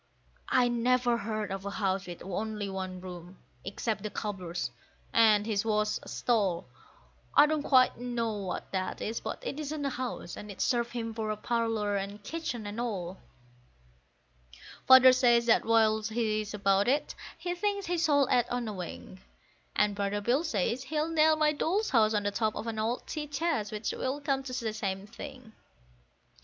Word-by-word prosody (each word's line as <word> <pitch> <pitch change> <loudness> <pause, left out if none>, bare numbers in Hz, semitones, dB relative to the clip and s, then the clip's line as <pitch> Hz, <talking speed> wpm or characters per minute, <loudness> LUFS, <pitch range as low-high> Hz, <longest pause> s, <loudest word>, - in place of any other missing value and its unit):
I 250 -1 +4
never 240 0 +2
heard 215 -2 -3
of 195 0 -4
a 200 - -3
house 195 -2 -1
with 175 -1 -8
only 210 +2 -3
one 185 -1 -5
room, 180 0 -9 0.3
except 210 +2 -3
the 210 - -4
cobbler's, 180 - -4 0.4
and 215 -2 +5
his 210 -3 0
was 210 -1 +1
a - - -13
stall. 200 -8 0 0.7
I 290 - +9
don't 305 0 0
quite 255 -4 +4
know 240 -2 -2
what 190 -3 -5
that 185 -1 -2
is; 225 +2 -3
but - - -6
it 295 - -4
isn't 300 -1 -3
a 275 - 0
house, 245 -9 -5
and 210 - -9
it 200 - -9
served 240 -2 +1
him 230 -2 -3
for 215 -1 -2
parlour 225 -2 0
and 200 +1 -5
kitchen 250 -5 -4
and 205 +3 -4
all. 190 -6 -4 1.7
Father 260 0 +9
says 240 -2 +4
that 230 - +4
whilst 220 -1 +3
he 215 -1 0
is 210 0 -6
about 195 0 +2
it, 285 +3 +1 0.2
he 350 +2 -3
thinks 400 +2 -1
he 350 0 -1
shall 290 -5 +3
add 245 -1 +3
on 245 -1 -2
a 215 - -3
wing; 185 0 -8 0.5
And 210 -1 +3
brother 200 0 -1
Bill 245 +9 +1
says 235 - 0
he'll 305 +3 -1
nail 315 -1 +4
my 305 -1 +3
Doll's 380 +8 0
House 220 -3 +4
on 205 - +1
the 205 - 0
top 215 +1 0
of - - -4
an 225 -1 -3
old 225 +3 -1
tea 300 -1 -4
chest, 290 -8 -1
which 215 0 -2
will 265 +3 -2
come 275 -2 0
to 255 -2 -5
the 220 - -1
same 195 -2 -3
thing. 250 0 -10
225 Hz, 180 wpm, -30 LUFS, 205-260 Hz, 1.7 s, I